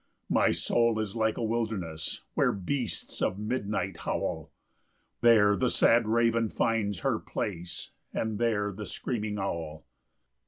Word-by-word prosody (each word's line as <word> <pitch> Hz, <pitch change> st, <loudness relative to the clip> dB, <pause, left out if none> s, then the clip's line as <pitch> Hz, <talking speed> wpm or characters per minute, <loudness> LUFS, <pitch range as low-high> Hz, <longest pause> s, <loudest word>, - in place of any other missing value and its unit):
5 -, -, -7 dB
My -, -, +4 dB
soul 115 Hz, -1 st, +2 dB
is 110 Hz, -1 st, -3 dB
like 110 Hz, -1 st, +1 dB
a -, -, -2 dB
wilderness, 110 Hz, -9 st, -2 dB
Where 125 Hz, -, +3 dB
beasts 120 Hz, +6 st, -3 dB
of 95 Hz, -, +1 dB
midnight 105 Hz, -4 st, -2 dB
howl; -, -, -3 dB, 0.7 s
There 110 Hz, -4 st, +6 dB
the 125 Hz, +3 st, +1 dB
sad 115 Hz, -1 st, +4 dB
raven 115 Hz, 0 st, +2 dB
finds 105 Hz, -4 st, 0 dB
her -, -, +1 dB
place, 90 Hz, -3 st, -4 dB, 0.2 s
And 110 Hz, -2 st, -2 dB
there 105 Hz, -3 st, +1 dB
the 105 Hz, +1 st, -7 dB
screaming 110 Hz, -4 st, -3 dB
owl. 80 Hz, -5 st, -4 dB
110 Hz, 140 wpm, -29 LUFS, 100-115 Hz, 0.7 s, There